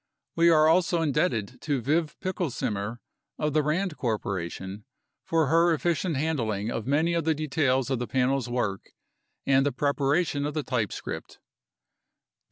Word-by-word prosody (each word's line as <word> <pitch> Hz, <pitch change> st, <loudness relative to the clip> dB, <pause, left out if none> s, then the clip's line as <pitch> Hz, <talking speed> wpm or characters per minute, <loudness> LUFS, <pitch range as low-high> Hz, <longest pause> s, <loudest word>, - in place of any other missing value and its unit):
We 170 Hz, 0 st, +5 dB
are 155 Hz, -2 st, +5 dB
also 170 Hz, 0 st, +3 dB
indebted 140 Hz, -, 0 dB
to 145 Hz, -3 st, 0 dB
Viv 155 Hz, +6 st, 0 dB
Pickelsimer 120 Hz, -, -2 dB, 0.4 s
of 150 Hz, -1 st, -1 dB
The 155 Hz, -, +4 dB
Rand 160 Hz, +3 st, -1 dB
Corporation 100 Hz, -, -3 dB, 0.4 s
for 165 Hz, -1 st, +2 dB
her 165 Hz, +3 st, +4 dB
efficient 170 Hz, 0 st, 0 dB
handling 115 Hz, -8 st, -1 dB
of 115 Hz, 0 st, -4 dB
many 155 Hz, +5 st, +2 dB
of 170 Hz, -1 st, 0 dB
the 160 Hz, 0 st, +1 dB
details 135 Hz, -3 st, 0 dB
of 130 Hz, -, 0 dB
the 120 Hz, -, -3 dB
Panel's 130 Hz, -1 st, 0 dB
work 110 Hz, -6 st, -2 dB, 0.5 s
and 135 Hz, 0 st, +4 dB
the 145 Hz, -, +1 dB
preparation 145 Hz, +2 st, +1 dB
of 150 Hz, -, -5 dB
the 155 Hz, -, -1 dB
typescript. 115 Hz, -8 st, -4 dB
145 Hz, 145 wpm, -27 LUFS, 120-160 Hz, 0.5 s, We